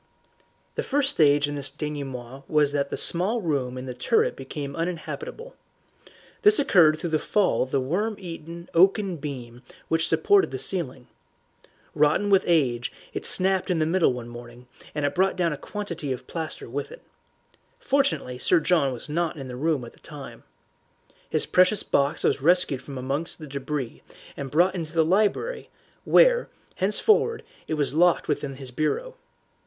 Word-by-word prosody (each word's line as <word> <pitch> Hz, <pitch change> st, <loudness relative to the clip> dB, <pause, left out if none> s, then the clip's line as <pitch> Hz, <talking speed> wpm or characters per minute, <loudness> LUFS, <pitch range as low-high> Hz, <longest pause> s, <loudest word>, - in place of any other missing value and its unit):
The -, -, -2 dB
first 280 Hz, 0 st, +1 dB
stage 145 Hz, -, +4 dB
in 145 Hz, -, -4 dB
this 140 Hz, -2 st, -3 dB
denouement 135 Hz, -3 st, -6 dB
was 150 Hz, -2 st, +3 dB
that 140 Hz, -1 st, -1 dB
the -, -, -4 dB
small 190 Hz, +8 st, +2 dB
room 140 Hz, -, -2 dB
in 130 Hz, -, -6 dB
the 125 Hz, -, -5 dB
turret 450 Hz, -, +1 dB
became 140 Hz, -3 st, -6 dB
uninhabitable. 440 Hz, -, -5 dB, 0.9 s
This 420 Hz, -1 st, +6 dB
occurred 165 Hz, -, +5 dB
through 165 Hz, +1 st, -4 dB
the 155 Hz, -, +2 dB
fall 205 Hz, +3 st, +1 dB
of 130 Hz, -, -1 dB
the 135 Hz, -, +1 dB
worm 190 Hz, +12 st, -1 dB
eaten 170 Hz, -2 st, -8 dB
oaken 190 Hz, +1 st, +3 dB
beam 125 Hz, -5 st, -7 dB, 0.3 s
which 165 Hz, 0 st, +2 dB
supported 405 Hz, -1 st, +3 dB
the -, -, -4 dB
ceiling. 135 Hz, -9 st, -2 dB, 0.9 s
Rotten 155 Hz, +8 st, +2 dB
with 195 Hz, -1 st, +5 dB
age, 130 Hz, -8 st, +1 dB, 0.2 s
it -, -, -2 dB
snapped 190 Hz, +1 st, +2 dB
in 180 Hz, -, +1 dB
the 155 Hz, -, +2 dB
middle 170 Hz, 0 st, +3 dB
one 125 Hz, -1 st, -6 dB
morning, 120 Hz, +1 st, -11 dB, 0.3 s
and 145 Hz, -1 st, 0 dB
brought 190 Hz, +4 st, +2 dB
down 170 Hz, -3 st, 0 dB
a -, -, -3 dB
quantity 170 Hz, -5 st, -5 dB
of 130 Hz, -, -4 dB
plaster 160 Hz, -2 st, -5 dB
with -, -, -5 dB
it. -, -, -12 dB, 0.8 s
Fortunately 275 Hz, -, 0 dB
Sir 170 Hz, +7 st, +3 dB
John 155 Hz, -5 st, +2 dB
was 120 Hz, -, -7 dB
not 160 Hz, +1 st, -1 dB
in 135 Hz, -2 st, -7 dB
the 125 Hz, -, -7 dB
room 145 Hz, -1 st, 0 dB
at 115 Hz, -, -12 dB
the -, -, -22 dB
time. 145 Hz, -4 st, -10 dB, 0.9 s
His -, -, +1 dB
precious 185 Hz, +3 st, +3 dB
box 140 Hz, +2 st, 0 dB
was -, -, +1 dB
rescued 155 Hz, -4 st, +3 dB
from 135 Hz, 0 st, -8 dB
amongst 140 Hz, +6 st, -2 dB
the 155 Hz, -, -9 dB
debris 140 Hz, -2 st, -5 dB, 0.3 s
and 140 Hz, -1 st, -5 dB
brought 175 Hz, +7 st, +3 dB
into 165 Hz, -4 st, -5 dB
the 165 Hz, -1 st, +3 dB
library, 210 Hz, -, 0 dB, 0.4 s
where, -, -, +5 dB, 0.3 s
henceforward, 430 Hz, -, +2 dB, 0.2 s
it 155 Hz, -, -1 dB
was 145 Hz, -2 st, 0 dB
locked 175 Hz, +2 st, +3 dB
within 135 Hz, -2 st, -2 dB
his 130 Hz, -1 st, -9 dB
bureau. 470 Hz, -, -2 dB
155 Hz, 170 wpm, -25 LUFS, 140-190 Hz, 0.9 s, This